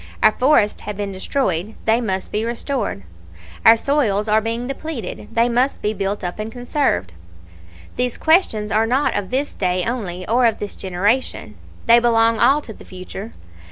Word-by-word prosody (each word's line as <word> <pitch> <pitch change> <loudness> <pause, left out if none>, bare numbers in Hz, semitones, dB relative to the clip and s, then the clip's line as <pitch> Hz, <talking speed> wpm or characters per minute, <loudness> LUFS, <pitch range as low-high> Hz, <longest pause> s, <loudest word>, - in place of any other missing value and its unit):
Our - - +7
forests 250 -3 +2
have 210 - -6
been 205 -1 -3
destroyed; 190 - -2
they 225 +2 +3
must 190 -5 -3
be 210 - -1
restored. 235 - -3 0.6
Our 225 +1 +8
soils 225 -6 +1
are 215 +1 +3
being 230 +2 -3
depleted; 260 - -6
they 230 +1 +2
must 250 +3 0
be 210 - 0
built 200 0 -3
up 175 +3 -4
and 215 +1 -4
conserved. 245 - -1 0.8
"These 250 -1 -1
questions 315 - +2
are 220 +2 +2
not 260 +5 +1
of 200 -2 -2
this 270 +3 -1
day 180 -1 0
only 190 -7 -4
or 240 +2 +3
of 225 - 0
this 205 - -5
generation. 200 +8 -1 0.3
They 235 0 +7
belong 230 -1 +3
all 285 +3 +4
to 225 - -10
the - - -14
future. 190 +4 -9
225 Hz, 170 wpm, -20 LUFS, 200-245 Hz, 0.8 s, Our